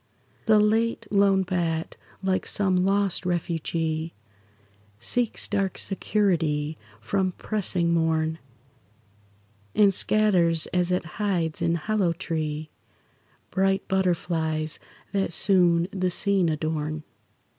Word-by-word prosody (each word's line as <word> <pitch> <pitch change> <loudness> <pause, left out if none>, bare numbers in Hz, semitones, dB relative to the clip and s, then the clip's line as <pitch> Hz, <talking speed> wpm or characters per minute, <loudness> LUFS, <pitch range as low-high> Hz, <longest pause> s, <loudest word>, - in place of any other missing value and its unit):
The 215 -1 +6
late, 225 +2 +1
lone 200 -1 +4
bat, 170 -3 -2 0.3
like 190 -1 0
some 190 -3 +2
lost 195 -1 +1
refugee, 165 -2 -2 0.8
Seeks 235 - +1
dark 195 -1 -1
security 165 -7 0 0.2
from 185 - -1
pressing 180 -5 0
morn, 160 -1 0 1.4
And 205 -2 +5
scatters, 180 -6 +3
as 180 0 +1
it 180 -1 0 0.2
hides 170 -7 -1
in 170 0 +1
hollow 190 0 0
tree, 155 -3 -4 0.8
Bright 195 0 +1
butterflies 165 -4 -1 0.3
that 195 -3 -1
soon 175 -2 +3
the 185 -1 -1
scene 190 -1 +1
adorn. 155 0 -2
175 Hz, 100 wpm, -25 LUFS, 160-195 Hz, 1.4 s, The